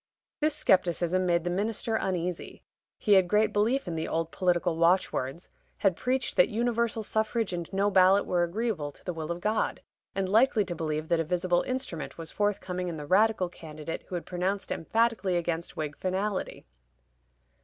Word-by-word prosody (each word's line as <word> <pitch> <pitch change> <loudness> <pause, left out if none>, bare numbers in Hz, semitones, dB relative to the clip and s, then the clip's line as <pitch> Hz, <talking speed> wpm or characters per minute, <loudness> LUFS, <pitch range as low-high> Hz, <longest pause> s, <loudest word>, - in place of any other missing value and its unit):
This 305 0 +1
scepticism 185 - +2
made 170 -1 +2
the 175 - -1
minister 220 +4 -1
uneasy: 180 -4 -3 0.3
he 210 - +3
had 190 -2 +6
great 210 +3 +2
belief 225 +4 +1
in 175 - -3
the 160 0 -2
old 165 0 -2
political 175 -2 +1
watchwords, 170 -3 +1 0.3
had 195 -4 +2
preached 255 +5 -1
that 180 - +6
universal 230 0 0
suffrage 220 -1 -1
and 170 -2 -4
no 200 +1 +1
ballot 190 +1 +5
were 175 -1 +1
agreeable 175 -4 -2
to - - -17
the 180 - -2
will 160 0 -4
of 170 +1 -4
God, 215 +2 0 0.4
and 195 -1 0
liked 225 +8 +4
to 175 - -4
believe 155 -1 -2
that 170 - +3
a - - +2
visible 175 +1 +1
"instrument" 255 - -4
was 165 -1 -6
forthcoming 190 -3 -1
in 170 -2 -4
the 150 - -6
Radical 200 +2 +3
candidate 155 -2 -7
who 185 - -5
had 175 - -4
pronounced 190 +3 -2
emphatically 220 -1 +1
against 170 0 -3
Whig 150 -2 -3
finality. 190 +2 -2
185 Hz, 175 wpm, -28 LUFS, 170-210 Hz, 0.4 s, had